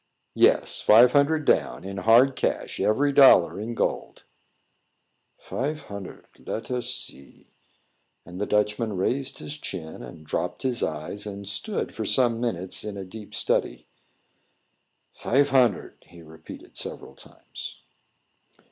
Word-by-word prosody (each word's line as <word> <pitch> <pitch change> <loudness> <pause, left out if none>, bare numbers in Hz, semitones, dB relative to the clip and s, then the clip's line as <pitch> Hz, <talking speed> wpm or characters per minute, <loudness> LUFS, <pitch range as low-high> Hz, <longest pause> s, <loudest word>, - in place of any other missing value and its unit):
"Yes; - - +3
five 120 +3 +7
hundred 145 +2 +2
down, - - +1
in 95 +1 -7
hard 115 +7 +5
cash - - -2
every 140 +7 +2
dollar 130 -11 +6
in 115 +3 -5
gold." - - -3 1.1
"Fife 150 +4 -4
hunnard. 100 -2 -9
Let 115 - -6
us 125 -1 -2
see." 125 - -9 0.7
And 90 +2 -9
the 105 - -1
Dutchman 105 +1 0
raised 130 +8 -1
his 150 +1 -7
chin 80 - -7
and 80 -2 -11
dropped - - -3
his 125 -2 -1
eyes, 80 +7 -4
and 100 -1 -7
stood 205 - -4
for 110 - -4
some 120 0 +2
minutes 95 -7 -2
in 105 -1 -6
a 95 - -6
deep 105 +3 -10
study. - - 0 1.3
"Fife 140 +3 +1
hunnard," 125 -8 +2
he 85 -1 -15
repeated 80 0 -13
several - - -5
times. - - -11
110 Hz, 130 wpm, -25 LUFS, 95-130 Hz, 1.3 s, five